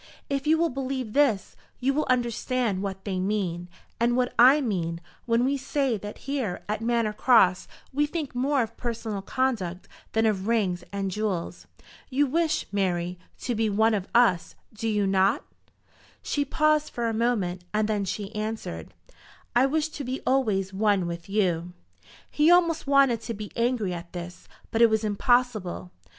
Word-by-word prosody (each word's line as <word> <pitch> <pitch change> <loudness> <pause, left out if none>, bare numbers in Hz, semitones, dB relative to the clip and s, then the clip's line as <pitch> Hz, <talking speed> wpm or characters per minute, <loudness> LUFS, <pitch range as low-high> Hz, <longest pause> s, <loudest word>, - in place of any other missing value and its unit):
If 275 +1 -1
you 320 +1 +5
will 335 +1 +2
believe 260 -3 -3
this, 270 -10 +2 0.2
you 265 +2 +1
will 305 +2 0
understand 240 -4 0
what 195 -1 -5
they 190 -3 -2
mean, 185 -3 -2 0.3
and 240 +1 +2
what 250 -1 0
I 260 +5 +8
mean, 175 - -2 0.3
when 235 +1 +3
we 280 +1 +1
say 270 -2 0
that 205 0 -7
here 265 -10 -2
at 210 +1 -2
Manor 230 -2 +1
Cross 200 -6 +4 0.3
we 295 +2 +2
think 305 -2 -4
more 265 +1 +1
of 225 - -8
personal 225 -4 -4
conduct 195 -7 -2 0.3
than 225 0 +2
of 205 -2 0
rings 200 -6 +1
and 195 -1 -2
jewels. 195 -4 -3 0.4
You 280 +2 +2
wish, 320 +3 0
Mary, 180 -3 -1 0.2
to 245 - -1
be 220 -1 +1
one 220 +2 +3
of 195 -3 -2
us; 230 -8 +3 0.2
do 220 +1 -4
you 210 -2 +1
not?" 195 +6 +2 0.8
She 290 -1 -1
paused 305 +1 +2
for 235 -1 -2
a 225 - -1
moment, 210 -6 0
and 215 0 +1
then 210 -2 0
she 200 +2 -4
answered, 210 - -5 0.6
"I 250 +3 +5
wish 310 +2 0
to 300 -2 -6
be 255 +1 -3
always 210 -8 +1
one 200 -2 +2
with 170 +1 -6
you." 180 -4 0 0.6
He 300 +2 +3
almost 335 -3 +4
wanted 275 -5 +4
to 230 - -5
be 210 0 -7
angry 235 -5 0
at 170 0 -8
this, 175 0 -8 0.2
but 225 - +1
it 235 - +8
was 220 0 +1
impossible. 215 -4 0
220 Hz, 170 wpm, -26 LUFS, 195-260 Hz, 0.8 s, I